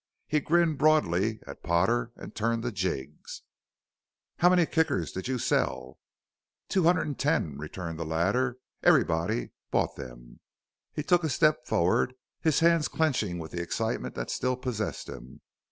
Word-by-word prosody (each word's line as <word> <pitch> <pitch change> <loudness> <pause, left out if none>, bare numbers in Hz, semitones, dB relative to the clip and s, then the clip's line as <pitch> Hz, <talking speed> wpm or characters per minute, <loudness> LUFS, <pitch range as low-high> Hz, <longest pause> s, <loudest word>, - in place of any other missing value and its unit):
He 150 - +1
grinned 165 -1 +2
broadly 110 - +2
at 70 - -10
Potter 115 +8 +1
and - - -10
turned 115 +1 -1
to 120 - -2
Jiggs. 85 - -4 0.9
"How 175 - +5
many 180 -2 +4
Kickers 155 - 0
did 95 - -5
you 130 -1 -1
sell?" 65 - -1 0.7
"Two 185 -4 +2
hundred 175 0 +4
an' 150 - -3
ten," 130 - 0
returned 80 +2 -6
the - - -1
latter; 100 +11 0 0.2
"everybody 80 -6 +2 0.2
bought - - 0
them." - - -10 0.5
He 150 - -4
took 175 +1 +3
a 160 - 0
step 155 -2 +2
forward; 115 +8 +2 0.3
his 160 -1 +2
hands 165 -2 +4
clenching 125 - 0
with 80 -2 -7
the 85 - -3
excitement 85 - -2
that - - -4
still 125 0 -1
possessed 125 -5 -3
him. 65 - -10
115 Hz, 155 wpm, -28 LUFS, -, 0.9 s, How